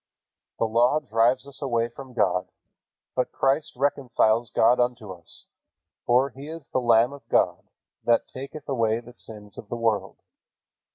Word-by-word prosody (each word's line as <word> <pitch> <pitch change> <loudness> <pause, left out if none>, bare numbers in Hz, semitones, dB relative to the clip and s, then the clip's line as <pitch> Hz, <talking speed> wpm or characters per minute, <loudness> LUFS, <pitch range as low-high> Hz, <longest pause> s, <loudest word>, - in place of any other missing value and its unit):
The - - +1
Law 120 +6 +3
drives 125 0 +2
us 140 - -7
away 120 -4 +1
from 130 +2 -11
God, 90 -5 +1 0.7
but 125 - 0
Christ 140 +3 +1
reconciles 125 -4 +2
God 120 +5 +4
unto 120 -4 0
us, 85 -3 -8 0.6
for 130 +3 +4
"He 135 +3 -10
is 160 -2 -8
the 130 - +2
Lamb 120 +2 +4
of 140 - -13
God, - - +1 0.3
that 120 -1 +3
taketh 140 +4 -8
away 115 -5 +1
the 120 +1 -13
sins 105 -4 -8
of 105 - -11
the 120 - -3
world." 115 -3 0
120 Hz, 155 wpm, -25 LUFS, 115-135 Hz, 0.7 s, God